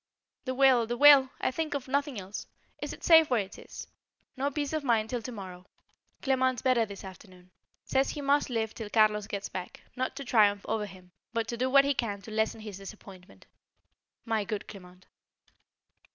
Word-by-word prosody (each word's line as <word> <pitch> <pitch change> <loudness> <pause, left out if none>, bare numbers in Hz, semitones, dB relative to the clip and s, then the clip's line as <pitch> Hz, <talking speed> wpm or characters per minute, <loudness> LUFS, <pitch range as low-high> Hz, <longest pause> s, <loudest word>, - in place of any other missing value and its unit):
The 260 -1 -2
will, 255 -4 +4
the 240 +1 -3
will! 280 -2 +8
I - - 0
think 310 +1 -3
of 275 -2 -4
nothing 280 -3 -1
else. 195 +2 -7 0.3
Is - - -4
it - - -11
safe 325 -2 +7
where 245 -4 +2
it 195 0 -9
is? - - -9 0.5
No 275 +1 -1
peace 290 +1 -3
of 310 -2 -1
mind 225 -4 +1
till 245 -2 -2
to 250 - -7
morrow. 185 -4 -9 0.6
Clement 260 -3 +1
better 245 -4 +3
this 200 -1 -9
afternoon. 185 -1 -13 0.3
Says 265 +1 +1
he - - -5
must 285 0 +2
live 225 -3 -2
till 220 -3 -7
Carlos 210 -1 +3
gets 200 -1 -4
back; 180 -1 -7
not 255 +1 -2
to 275 0 -7
triumph 205 -4 +3
over 215 -1 -1
him, 185 -2 -15 0.2
but 230 -1 -1
to 235 - -2
do 255 +2 0
what 275 +1 +6
he 280 - +2
can 215 -6 -2
to 220 - -10
lessen 220 0 -1
his 210 -3 -8
disappointment. 190 - -13 0.8
My 225 -2 0
good 200 +1 -5
Clement! 185 -3 -13
225 Hz, 195 wpm, -29 LUFS, 200-265 Hz, 0.8 s, will